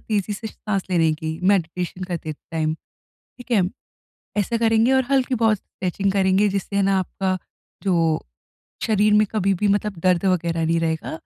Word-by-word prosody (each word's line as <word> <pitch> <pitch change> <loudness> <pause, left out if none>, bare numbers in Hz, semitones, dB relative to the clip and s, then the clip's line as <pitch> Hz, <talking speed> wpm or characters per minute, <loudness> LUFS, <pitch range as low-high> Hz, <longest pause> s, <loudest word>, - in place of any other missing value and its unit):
तेज़ी 210 -1 -1
से 220 +2 -5
साँस 195 -3 -3
लेने 165 -3 +3
की, 160 +1 -5
मेडिटेशन 180 -1 0
करते 170 -3 -4
टाइम, 155 +1 -3 0.4
ठीक 245 -1 -16
है। 210 -5 +4 0.8
ऐसा 220 +3 +1
करेंगे, 225 +2 +3
और 265 -1 +3
हल्की-बहुत 245 -5 +2
स्ट्रेचिंग 190 +1 -2
करेंगे, 195 +1 +3
जिससे 200 0 -3
है 200 - +3
ना 195 0 +3
आपका 185 0 -1 0.5
जो 165 -5 +1 0.6
शरीर 210 -1 +3
में 210 0 +5
कभी 195 -3 +1
भी 210 - +3
मतलब 205 -1 0
दर्द 180 0 +3
वगैरह 170 -3 +1
नहीं 165 +1 +2
रहेगा 160 -1 -2
195 Hz, 160 wpm, -22 LUFS, 170-210 Hz, 0.8 s, में